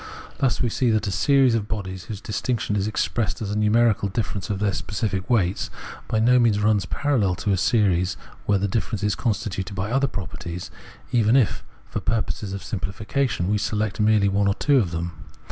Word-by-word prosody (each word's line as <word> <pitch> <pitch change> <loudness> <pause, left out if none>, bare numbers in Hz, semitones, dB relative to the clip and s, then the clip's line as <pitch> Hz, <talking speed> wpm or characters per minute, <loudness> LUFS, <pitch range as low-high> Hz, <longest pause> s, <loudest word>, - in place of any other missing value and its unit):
Thus 135 -4 +1
we 120 - +1
see 125 +2 +1
that 110 -1 +1
a 100 - -1
series 135 +4 +4
of 110 -3 0
bodies, 95 -4 -5
whose 105 -2 -6
distinction 110 -1 -2
is 100 0 0
expressed 110 -1 -1
as 105 -2 -3
a - - -1
numerical 105 -1 +3
difference 100 -1 -3
of 100 - -1
their 100 0 0
specific 105 -1 -3
weights, 100 -6 +1 0.4
by - - 0
no 125 +3 +5
means 115 -4 +3
runs 105 -3 +2
parallel 120 -11 +1
to 100 - -1
a 95 - +2
series 95 -4 +2 0.3
where 100 - +4
the 100 +1 0
difference 100 0 -2
is 105 -1 +2
constituted 100 -3 -2
by 100 +3 -2
other 135 +2 +2
properties, 90 - -6 0.4
even 115 0 +3
if, 125 -8 +2 0.2
for - - -4
purposes 110 -3 -2
of 100 0 -5
simpHfication, 105 +3 -2
we 105 +1 +1
select 105 0 -1
merely 105 -1 +4
one 100 +1 +2
or 100 - +2
two 145 -2 +3
of 100 -7 0
them. 85 +1 -5
105 Hz, 195 wpm, -24 LUFS, 95-115 Hz, 0.4 s, no